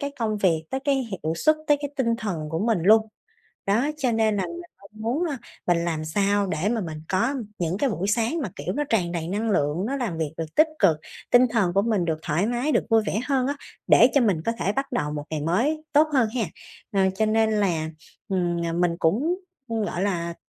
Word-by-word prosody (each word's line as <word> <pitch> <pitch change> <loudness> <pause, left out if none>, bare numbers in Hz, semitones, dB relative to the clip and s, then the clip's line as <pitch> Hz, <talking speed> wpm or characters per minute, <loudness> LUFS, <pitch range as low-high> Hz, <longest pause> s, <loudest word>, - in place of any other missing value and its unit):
cái 285 -1 -2
công 215 -3 -1
việc, 165 -5 +2
tới 265 - -2
cái 280 0 +1
hiệu 205 -11 -2
suất, 310 - +3
tới 295 - +5
cái 285 - -4
tinh 230 -3 +1
thần 170 -9 -3
của 160 - -2
mình 225 +1 +1
luôn. 220 +3 +5 0.6
Đó, 230 +9 +2
cho 260 -5 0
nên 220 -1 +2
là 195 - 0
mình 345 0 -7 0.2
không 200 - -17
muốn 250 +10 0
á 275 - -4 0.3
mình 170 -1 +2
làm 160 -2 -2
sao 200 +4 +1
để 185 +1 -1
mà 230 0 0
mình 160 -4 -5
có 230 +9 +1 0.2
những 175 +2 -1
cái 275 +1 +1
buổi 190 0 -2
sáng 230 +9 +1
mà, - - -3
kiểu, - - -3
nó 295 - 0
tràn 180 -6 +1
đầy 165 -2 -3
năng 215 +4 -1
lượng, 160 +1 +1
nó 275 +4 -1
làm 225 -11 -3
việc 155 -1 -2
được 160 -1 -5
tích 310 +1 +5
cực, 160 - +4 0.3
tinh 245 +1 +6
thần 200 -7 +1
của 200 - +4
mình 210 -5 +1
được 160 -2 -1
thoải 170 +7 0
mái, 245 +6 0
được - - +2
vui 225 -1 +5
vẻ 215 - 0
hơn 265 -3 +1
á, 285 +1 -1 0.3
để 245 - +7
cho 280 - +5
mình 195 -10 +2
có 230 - +2
thể 200 - +1
bắt 275 +3 -3
đầu 150 -12 -1
một 145 -1 -4
ngày 155 -2 -2
mới 240 - 0
tốt 300 +2 +5
hơn 255 -6 +3
ha. 240 - +1 0.5
Ờ, 190 -1 +3
cho 220 +3 +1
nên 220 0 +2
là, 175 -7 0 0.4
ừm, 175 -3 0
ờ, 165 - -2
mình 175 0 +1
cũng, 240 - +1 0.3
ừm, 225 -1 -1
gọi 180 -2 -3
là, 170 -4 -1
205 Hz, 240 wpm, -25 LUFS, 170-245 Hz, 0.6 s, để